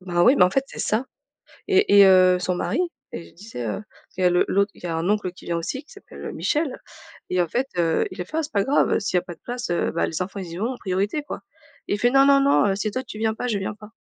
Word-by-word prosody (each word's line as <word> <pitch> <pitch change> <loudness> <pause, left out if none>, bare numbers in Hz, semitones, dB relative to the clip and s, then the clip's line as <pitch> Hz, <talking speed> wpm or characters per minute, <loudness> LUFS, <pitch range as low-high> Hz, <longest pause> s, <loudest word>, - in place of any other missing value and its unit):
Ben 175 -2 -2
oui, 255 +7 +6
bah, 180 - +6
en - - -2
fait, 270 +6 +1
c'est - - -11
ça, 220 +5 0 0.6
et 390 - +4
et 200 - +10
heu, 185 -1 +6
son 180 0 -1
mari 345 - -1 0.3
et 170 - -5
je - - -20
disais, 175 - -8
heu, 110 - -3 0.4
il - - -2
y - - +2
a 180 - +6
le 175 - +3
l'autre 200 +1 +1
il - - -19
y - - -3
a 165 - -2
un 165 +4 -1
oncle 205 -4 0
qui 180 - -16
vient 170 - -1
aussi 260 - -4
qui - - -22
s'appelle, 405 - -12
heu, - - -4
Michel 300 -3 -1 0.5
et 180 0 +2
en 170 - 0
fait, 255 +10 -1
heu, 165 -2 +2
il - - -10
a - - -4
fait: 310 - -5
«Ah, 320 - +1
c'est 300 - -7
pas 200 - +2
grave, 275 +7 +2
heu, - - +2
s'il 200 -3 0
y - - +5
a - - -7
pas 175 -2 -9
de - - -38
place, 245 -2 -5
heu, 175 - 0
bah, 170 - 0
les 165 +2 -4
enfants 195 +2 -4
ils 180 -3 -7
y 170 - -6
vont 220 +5 -1
en 250 - -7
priorité, 200 +9 -1
quoi» - - -7 0.5
et - - -1
il 205 - -1
fait: 240 - +3
«Non, 270 0 +6
non, 275 0 +5
non, 275 -6 +4
heu, 195 - +1
si 210 +2 -2
toi 255 +3 -3
tu 215 - -10
viens 220 0 +1
pas, 250 - -3
je 210 -4 0
viens 195 +2 -4
pas». 210 0 -13
200 Hz, 325 wpm, -23 LUFS, 180-250 Hz, 0.6 s, et